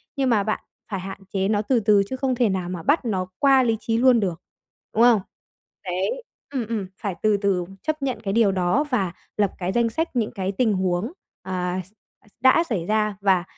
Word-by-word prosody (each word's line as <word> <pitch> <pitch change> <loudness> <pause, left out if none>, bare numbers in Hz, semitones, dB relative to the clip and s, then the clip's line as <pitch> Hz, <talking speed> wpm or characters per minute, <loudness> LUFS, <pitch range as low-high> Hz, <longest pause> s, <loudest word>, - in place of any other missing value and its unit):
nhưng 270 -2 +1
mà 215 -4 +3
bạn 215 +1 -1 0.3
phải 195 - -2
hạn 195 +2 -7
chế 195 -1 +1
nó 205 0 +2
từ 240 +3 +2
từ, 210 -2 +4
chứ 260 - -2
không 260 -1 0
thể 240 -3 +2
nào 185 -2 -2
mà 180 -2 -5
bắt 285 0 +2
nó 190 -5 -1
qua 270 -2 +5
lý 225 -2 +1
trí 225 0 -1
luôn 250 0 +5
được, 180 -6 -2 0.5
đúng 225 - +4
không? 235 -4 +6 0.6
Đấy 190 - -2 0.3
ừm, 260 -5 -2
ừm, 215 -4 -2
phải 200 -4 -2
từ 215 -1 +4
từ 195 -3 0 0.2
chấp 310 -1 -2
nhận 260 -5 -2
cái 195 -2 -1
điều 220 -2 +4
đó 185 +9 +1
và 195 -10 0 0.2
lập 205 -2 +2
cái 180 0 -2
danh 235 +2 +2
sách 320 +5 -2
những 225 -3 0
cái 190 -3 -2
tình 220 +2 +1
huống, 185 +4 0 0.3
à, 180 0 -2
x 190 - -18 0.4
x - - -28
đã 260 +6 +6
xảy 215 - -2
ra 215 +1 +1
và, 190 -3 +3
210 Hz, 220 wpm, -23 LUFS, 190-245 Hz, 0.6 s, không